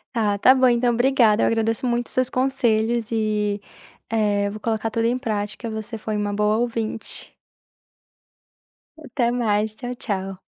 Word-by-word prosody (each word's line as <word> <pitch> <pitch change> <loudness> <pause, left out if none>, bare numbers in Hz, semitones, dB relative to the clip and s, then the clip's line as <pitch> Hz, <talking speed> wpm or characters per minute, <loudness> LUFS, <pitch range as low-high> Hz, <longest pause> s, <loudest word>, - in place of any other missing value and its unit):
Ah, 210 -3 +1
tá 255 - +6
bom 260 -1 +4
então, 240 0 +2
obrigada, 240 -3 +3
eu - - +3
agradeço 225 +2 0
muito 240 0 0
seus 255 0 +1
conselhos 235 -4 +1
e, 210 -2 0 0.5
eh, 205 -2 +1
eu 200 - -2
vou 215 - -7
colocar 225 0 -2
tudo 230 +1 0
em 245 - +1
prática, 220 -1 -3
você 220 +1 -5
foi 215 0 -4
uma 205 -1 -1
boa 210 +1 +1
ouvinte. 230 -2 -3 1.6
Até 255 -5 -1
mais, 215 -3 0
tchau, 245 +2 -5
tchau. 195 -4 -4
225 Hz, 155 wpm, -23 LUFS, 210-240 Hz, 1.6 s, tá